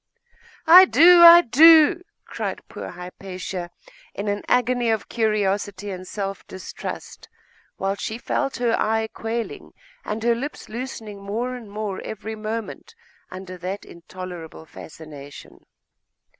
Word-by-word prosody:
'I 360 +4 +9
do! 350 +1 +6
I 340 0 +10
do!' 320 +5 +6 0.2
cried - - -6
poor - - -8
Hypatia, 180 0 -7 0.5
in 200 - -5
an 205 0 -2
agony 245 -1 +1
of 220 -2 -1
curiosity 205 -2 -1
and 185 0 -8
self 195 -1 -5
distrust, 190 - -8 0.5
while 195 0 -1
she 220 +2 -5
felt 270 +2 -2
her 240 -2 +1
eye 220 0 0
quailing 225 +1 -5 0.3
and 220 +1 -5
her 235 0 +3
limbs 270 +6 -6
loosening 220 -4 -7
more 225 +6 -4
and 240 -4 -9
more 205 -2 -5
every 220 +1 -7
moment 220 - -6 0.3
under 185 0 -9
that 185 +3 -6
intolerable 170 -2 -10
fascination. 150 -3 -13
215 Hz, 125 wpm, -22 LUFS, 190-240 Hz, 0.5 s, I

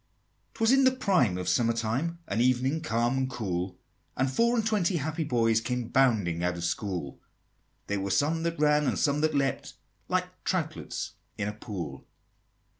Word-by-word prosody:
'Twas 225 +1 +3
in 270 0 +5
the 260 - +7
prime 185 - +2
of 90 - -4
summer 115 -2 +2
time, 120 +10 -1
An 115 - 0
evening 130 +5 +2
calm 120 -4 0
and 130 0 0
cool, 95 -7 -3 0.4
And 130 0 +1
four 235 - +2
and 225 -2 +1
twenty 205 -5 +1
happy 160 +2 -2
boys 115 -5 +2
Came 125 -1 -3
bounding 105 -11 +2
out 90 0 0
of 85 - -5
school: 85 -4 -3 0.7
There 100 -1 -1
were 100 0 -2
some 150 - +1
that 170 0 -2
ran 150 -1 +3
and - - 0
some 145 -1 +1
that 155 -1 +1
leapt, 135 -1 -1 0.3
Like - - -2
troutlets - - -2 0.3
in 100 - -1
a 105 - -3
pool. 90 - -7
125 Hz, 175 wpm, -28 LUFS, 100-155 Hz, 0.7 s, the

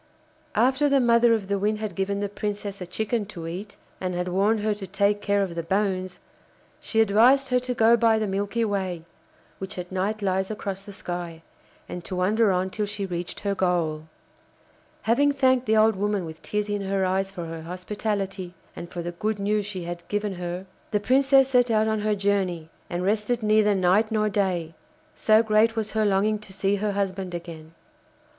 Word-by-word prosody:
After 260 +6 +3
the 280 -1 +4
mother 235 -1 +4
of 205 -3 -4
the 200 0 0
Wind 210 +2 +1
had 215 -1 -4
given 200 +1 -1
the 205 - 0
Princess 205 -1 -4
a 180 - -5
chicken 220 +4 -1
to 170 -5 -8
eat, 190 +5 -7 0.2
and 180 -1 -3
had 180 0 -2
warned 205 +4 +2
her 215 0 +1
to 200 -2 -8
take 205 +1 +1
care 200 -1 +2
of 185 -3 -4
the 170 - -3
bones, 185 0 -1 0.6
she 225 - +1
advised 240 +6 +4
her 250 0 +3
to 250 0 -4
go 230 +1 +5
by 230 -1 +3
the 220 - 0
Milky 205 +3 -1
Way, 190 -5 -2 0.5
which 190 0 -6
at 180 0 -6
night 200 +3 -2
lies 190 0 0
across 200 -2 -4
the 205 +1 -11
sky, 175 -3 -6 0.4
and 180 - -6
to 185 - -5
wander 205 +4 +3
on 185 +1 0
till 210 0 -2
she 205 -1 -3
reached 175 -2 -5
her 200 -1 0
goal. 170 -5 0 1.0
Having 285 +6 +3
thanked 260 -3 +2
the 220 0 +3
old 220 0 +5
woman 205 -1 -1
with 160 0 -9
tears 210 0 -2
in 205 -1 -2
her 195 -1 0
eyes 190 +1 0
for 180 -3 -6
her 165 0 -6
hospitality, 190 +1 -4 0.2
and 170 - -7
for 175 - -5
the 175 - -3
good 210 +5 -2
news 205 0 0
she 190 -4 -4
had 170 0 -7
given 205 -1 -1
her, 180 +1 -5 0.2
the 210 - +1
Princess 270 +3 +4
set 250 -2 +3
out 220 -1 +3
on 220 0 0
her 210 0 +1
journey 190 -5 -1 0.2
and 175 +1 -2
rested 215 +4 0
neither 215 -1 +4
night 190 +4 +3
nor 215 -1 +1
day, 185 -5 -1 0.4
so 215 +1 +4
great 220 +1 +3
was 220 -1 -2
her 215 0 +1
longing 205 +2 +2
to 210 -2 -11
see 195 +1 0
her 205 0 -1
husband 190 -2 -2
again. 165 -2 -9
200 Hz, 200 wpm, -25 LUFS, 185-215 Hz, 1.0 s, go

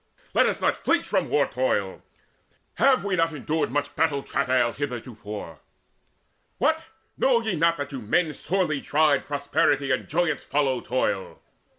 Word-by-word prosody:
Let - - +4
us - - -1
not - - 0
flinch - - +2
from - - 0
war - - +3
toil! - - -1 0.8
have 270 -4 +4
we 195 -2 0
not 165 -2 +1
Endured 150 +2 -1
much 145 +2 -2
battle 145 -4 +1
travail 125 -2 +1
heretofore? 110 - -6 1.0
What, 320 0 +1 0.4
know 255 -3 +4
ye 220 -4 -1
not 170 +1 +2
that 145 -1 -5
to 135 -3 -5
men 155 +9 +1
sorely 155 -2 -1
tried 150 -1 +2
Prosperity 145 -1 +1
and 130 - -1
joyance 160 -1 0
follow 135 -3 0
toil? 100 -6 -2
145 Hz, 150 wpm, -25 LUFS, 130-165 Hz, 1.0 s, Let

